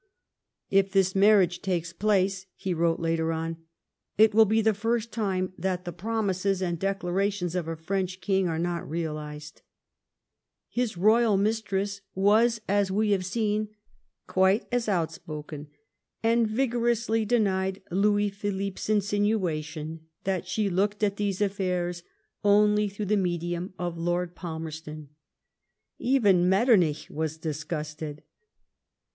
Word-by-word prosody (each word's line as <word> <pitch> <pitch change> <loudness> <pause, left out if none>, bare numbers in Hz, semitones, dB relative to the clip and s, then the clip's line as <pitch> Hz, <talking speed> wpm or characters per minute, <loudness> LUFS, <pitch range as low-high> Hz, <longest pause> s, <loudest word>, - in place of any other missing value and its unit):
" - - -59 0.3
If 195 0 +4
this 190 -1 +3
marriage 195 -3 +4
takes 175 -3 -2
place," 195 -2 +1
he 190 - -3
wrote 165 0 +1
later 165 -1 0
on, 165 0 -2
^^ - - -24 0.6
it 220 0 +6
will 220 +1 +7
be 220 +2 +2
the 220 0 +3
first 230 +2 -1
time 185 -4 -1
that 185 -1 -2
the 175 - -5
promises 195 -1 -1
and 175 -3 -2
declarations 195 -1 -1
of 180 -3 -2
a 165 - -3
French 185 +3 -3
king 190 0 +1
are 165 -2 -1
not 170 -1 -2
realised/' 150 -2 -5 1.1
His 240 -6 -2
royal 215 +2 +4
mistress 200 -1 -1
was, 215 +4 +3
as 200 0 +2
we 210 +2 +1
have 195 -2 +2
seen, 210 +2 -1 0.6
quite 190 +4 +2
as 245 -3 0
out 170 -5 +1
spoken, 150 -2 -8 0.6
and 230 0 +3
vigorously 235 -1 +1
denied 195 -4 0
Louis 205 +2 +2
Philippe's 200 -1 -4
insinua 205 -5 +1
tion 155 +1 -7 0.2
that 185 -2 -2
she 205 +2 0
looked 205 +3 0
at 200 -1 +1
these 200 -1 -1
affairs 180 -3 -1 0.4
only 210 0 +4
through 205 +1 -5
the 210 +2 +2
medium 175 0 -2
of 175 -1 -4
Lord 175 +1 -1
Palmerston. 160 -3 -7 0.9
Even 205 -9 +3
Metternich 190 - +3
was 160 0 -3
disgusted. 150 -1 -5
190 Hz, 135 wpm, -27 LUFS, 170-210 Hz, 1.1 s, will